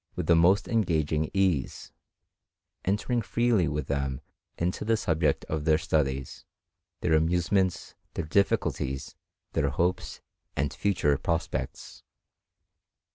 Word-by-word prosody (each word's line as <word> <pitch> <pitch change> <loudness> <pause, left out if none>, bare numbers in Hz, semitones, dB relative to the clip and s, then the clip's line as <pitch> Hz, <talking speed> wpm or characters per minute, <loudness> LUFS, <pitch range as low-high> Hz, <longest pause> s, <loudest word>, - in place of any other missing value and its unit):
309 - - -35
with 90 - -1
the 85 +1 +5
most 100 +3 +3
engaging 80 -8 +1
ease, 95 -8 0 0.9
entering 110 +5 0
freely 115 -5 +2
with 75 -1 -2
them 70 -1 -2 0.4
into 90 +2 -1
the 110 +1 +2
subject 80 -7 0
of 80 -1 -3
their 80 0 +4
studies, 70 -5 -1 0.6
their 85 - +1
amusements, 90 +4 +1 0.2
their 80 - -2
difficulties, 70 -6 0 0.4
their 70 - +1
hopes 85 +6 -1 0.4
and 70 0 -1
future 90 -8 +1
prospects. 85 0 -3
80 Hz, 115 wpm, -28 LUFS, 75-95 Hz, 0.9 s, the